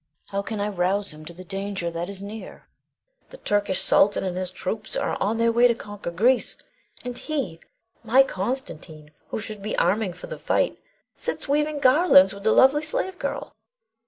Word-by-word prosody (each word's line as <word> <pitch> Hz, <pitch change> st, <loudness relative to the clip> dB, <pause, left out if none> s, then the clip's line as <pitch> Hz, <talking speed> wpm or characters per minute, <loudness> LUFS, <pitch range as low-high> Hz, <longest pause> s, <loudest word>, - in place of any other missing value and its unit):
How 200 Hz, 0 st, -1 dB
can 215 Hz, +1 st, -5 dB
I 205 Hz, -, 0 dB
rouse 195 Hz, -1 st, 0 dB
him 155 Hz, 0 st, -12 dB
to 170 Hz, -, -8 dB
the 180 Hz, +2 st, -10 dB
danger 195 Hz, -2 st, -3 dB
that 170 Hz, +2 st, -4 dB
is 200 Hz, 0 st, -6 dB
near! 210 Hz, +2 st, -9 dB, 0.6 s
The -, -, -12 dB
Turkish 205 Hz, -, 0 dB
sultan 205 Hz, +1 st, +3 dB
and 185 Hz, -2 st, -2 dB
his 185 Hz, 0 st, -3 dB
troops 200 Hz, +4 st, -4 dB
are -, -, -1 dB
on 215 Hz, +3 st, +1 dB
their 230 Hz, 0 st, +3 dB
way 240 Hz, +1 st, +5 dB
to 235 Hz, -, +1 dB
conquer 205 Hz, -5 st, -7 dB
Greece, 235 Hz, +10 st, +2 dB, 0.5 s
and 245 Hz, -1 st, -5 dB
he, 255 Hz, -, -3 dB, 0.4 s
my 250 Hz, +4 st, +6 dB
Constantine, 180 Hz, -, -5 dB, 0.2 s
who -, -, -4 dB
should 215 Hz, -1 st, -6 dB
be 210 Hz, +2 st, -3 dB
arming 195 Hz, +1 st, +1 dB
for 180 Hz, -, -10 dB
the -, -, -7 dB
fight, -, -, 0 dB, 0.4 s
sits -, -, -3 dB
weaving 295 Hz, +1 st, 0 dB
garlands 255 Hz, -, +6 dB
with 200 Hz, -, -10 dB
the 220 Hz, +2 st, +2 dB
lovely 270 Hz, +5 st, +5 dB
slave 365 Hz, +4 st, -3 dB
girl! -, -, -4 dB
205 Hz, 185 wpm, -24 LUFS, 185-245 Hz, 0.6 s, my